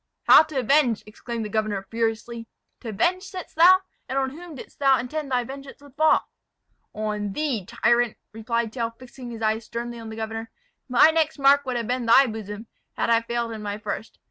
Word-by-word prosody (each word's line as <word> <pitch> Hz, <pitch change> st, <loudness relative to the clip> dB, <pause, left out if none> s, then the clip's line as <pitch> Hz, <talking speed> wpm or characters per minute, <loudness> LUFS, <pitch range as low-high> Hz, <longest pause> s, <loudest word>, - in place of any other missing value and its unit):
"How -, -, +8 dB
to 310 Hz, -3 st, -5 dB
avenge?" 255 Hz, -2 st, +2 dB
exclaimed 225 Hz, +1 st, -6 dB
the -, -, -5 dB
governor, 210 Hz, -3 st, -1 dB
furiously. 230 Hz, 0 st, -2 dB, 0.3 s
"To 235 Hz, -, -7 dB
avenge, 350 Hz, -, +1 dB
saidst 375 Hz, -2 st, -9 dB
thou? 365 Hz, +4 st, +7 dB, 0.3 s
and 265 Hz, -, -2 dB
on 265 Hz, -1 st, 0 dB
whom 330 Hz, +2 st, -10 dB
didst 260 Hz, -, -12 dB
thou 270 Hz, -2 st, +5 dB
intend 285 Hz, +4 st, -4 dB
thy 250 Hz, -1 st, +1 dB
vengeance 275 Hz, +2 st, -10 dB
would 285 Hz, -2 st, -17 dB
fall?" 310 Hz, +1 st, +3 dB, 0.6 s
"On 210 Hz, -2 st, -3 dB
thee, 255 Hz, -10 st, -2 dB
tyrant!" 235 Hz, 0 st, +1 dB
replied 225 Hz, +1 st, -2 dB
Tell, 230 Hz, -3 st, -2 dB
fixing 245 Hz, +1 st, -11 dB
his 225 Hz, -1 st, -7 dB
eyes 220 Hz, +1 st, 0 dB
sternly 235 Hz, 0 st, -5 dB
on 225 Hz, -1 st, -8 dB
the 220 Hz, -, -7 dB
governor. 225 Hz, 0 st, -5 dB, 0.4 s
"My 250 Hz, +6 st, +6 dB
next 320 Hz, -1 st, 0 dB
mark 280 Hz, 0 st, +4 dB
would 250 Hz, -1 st, -1 dB
have 235 Hz, -, -2 dB
been 245 Hz, 0 st, -2 dB
thy 265 Hz, +4 st, +7 dB
bosom, 215 Hz, -2 st, -6 dB, 0.3 s
had -, -, -1 dB
I 230 Hz, 0 st, +4 dB
failed 235 Hz, 0 st, -3 dB
in 220 Hz, -1 st, -6 dB
my 205 Hz, -1 st, -4 dB
first. 215 Hz, +1 st, -6 dB
235 Hz, 195 wpm, -24 LUFS, 225-275 Hz, 0.6 s, How